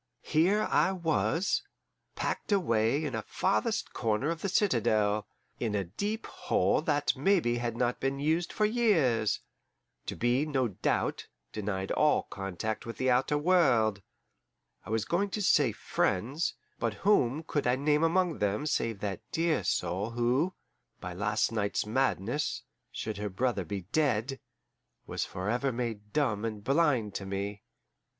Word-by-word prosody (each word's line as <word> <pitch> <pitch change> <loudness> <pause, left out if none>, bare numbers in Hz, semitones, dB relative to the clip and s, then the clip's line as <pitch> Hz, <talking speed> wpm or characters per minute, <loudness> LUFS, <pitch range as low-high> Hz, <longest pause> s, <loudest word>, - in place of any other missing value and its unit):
Here 190 +7 +3
I 185 - +4
was, 170 +1 +1 0.5
packed - - -3
away 140 - +2
in 140 - -3
a 110 - -1
farthest - - -1
corner 115 +7 0
of 165 0 -4
the 200 - -1
citadel, 110 - +2 0.3
in 110 -3 -1
a 100 - +1
deep 205 - -3
hole - - +1
that - - +1
maybe 170 -12 +2
had 120 -1 -3
not 120 0 0
been 135 +1 -1
used 160 +5 0
for 215 - +1
years, 165 - +2 0.7
to - - -3
be, 120 +4 +2
no 135 -5 0
doubt, 95 - -1 0.3
denied 100 -2 -3
all 150 0 +3
contact 95 +2 -4
with 115 - -7
the 130 0 +2
outer 135 +4 +2
world 130 - +3 0.9
I - - -8
was 110 -1 0
going 195 +4 0
to - - -2
say 145 -9 +4
FRIENDS, 130 - -1 0.2
but 115 -2 -1
whom 155 - +3
could 145 -4 -1
I 125 - +4
name 150 +3 +2
among 175 0 +2
them 105 +6 0
save 115 -8 -1
that 100 -3 -3
dear 165 -1 +1
soul 90 +5 -1
who, 125 +9 +1 0.4
by 90 - -6
last 105 +5 0
night's 100 -3 -1
madness, 125 +3 0 0.3
should 110 -2 -4
her 105 0 -3
brother 110 +1 0
be 100 +4 -4
dead, 135 -3 +1 0.7
was - - -2
forever 120 +9 -1
made 115 -4 -4
dumb 115 -8 0
and 110 -2 -4
blind 135 -7 +2
to 100 - -4
me? 100 +1 -3
120 Hz, 150 wpm, -30 LUFS, 105-155 Hz, 0.9 s, I